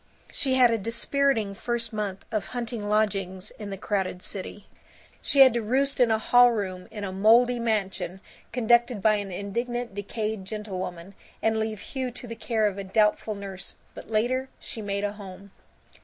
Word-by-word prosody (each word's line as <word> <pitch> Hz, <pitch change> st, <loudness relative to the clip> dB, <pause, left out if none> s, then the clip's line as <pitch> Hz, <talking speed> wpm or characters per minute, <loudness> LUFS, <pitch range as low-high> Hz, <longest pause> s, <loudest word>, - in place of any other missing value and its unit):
She 265 Hz, -2 st, 0 dB
had 250 Hz, -2 st, +6 dB
a 230 Hz, -, +1 dB
dispiriting 230 Hz, 0 st, 0 dB
first 230 Hz, +2 st, -3 dB
month 205 Hz, -3 st, -3 dB
of 215 Hz, -2 st, -1 dB
hunting 230 Hz, -3 st, -3 dB
lodgings 195 Hz, -3 st, 0 dB
in 210 Hz, -2 st, -6 dB
the 195 Hz, -, -5 dB
crowded 190 Hz, -2 st, -2 dB
city. 200 Hz, +1 st, -7 dB, 0.6 s
She 280 Hz, -, +3 dB
had 260 Hz, -3 st, +9 dB
to 235 Hz, -, 0 dB
roost 265 Hz, +6 st, +1 dB
in 245 Hz, -2 st, +5 dB
a 220 Hz, -, +3 dB
hall 245 Hz, +2 st, +6 dB
room 185 Hz, -4 st, -3 dB
in 215 Hz, -2 st, -7 dB
a 195 Hz, -, -3 dB
moldy 235 Hz, +5 st, +5 dB
mansion 200 Hz, -5 st, -1 dB, 0.3 s
conducted 240 Hz, -1 st, +3 dB
by 215 Hz, +2 st, +4 dB
an 200 Hz, -2 st, -4 dB
indignant 235 Hz, +5 st, -3 dB
decayed 210 Hz, +1 st, -3 dB
gentlewoman, 190 Hz, -3 st, -5 dB, 0.3 s
and 220 Hz, 0 st, +2 dB
leave 220 Hz, -2 st, -2 dB
Hugh 260 Hz, -2 st, -3 dB
to 245 Hz, -, -8 dB
the 230 Hz, -1 st, -6 dB
care 225 Hz, -1 st, 0 dB
of 200 Hz, -1 st, 0 dB
a -, -, -3 dB
doubtful 210 Hz, +2 st, +2 dB
nurse. 195 Hz, -2 st, -8 dB, 0.2 s
But -, -, -11 dB
later 250 Hz, +4 st, 0 dB
she 225 Hz, -, -6 dB
made 200 Hz, -1 st, -2 dB
a 205 Hz, -, 0 dB
home. 200 Hz, -1 st, -11 dB
215 Hz, 175 wpm, -26 LUFS, 200-235 Hz, 0.6 s, had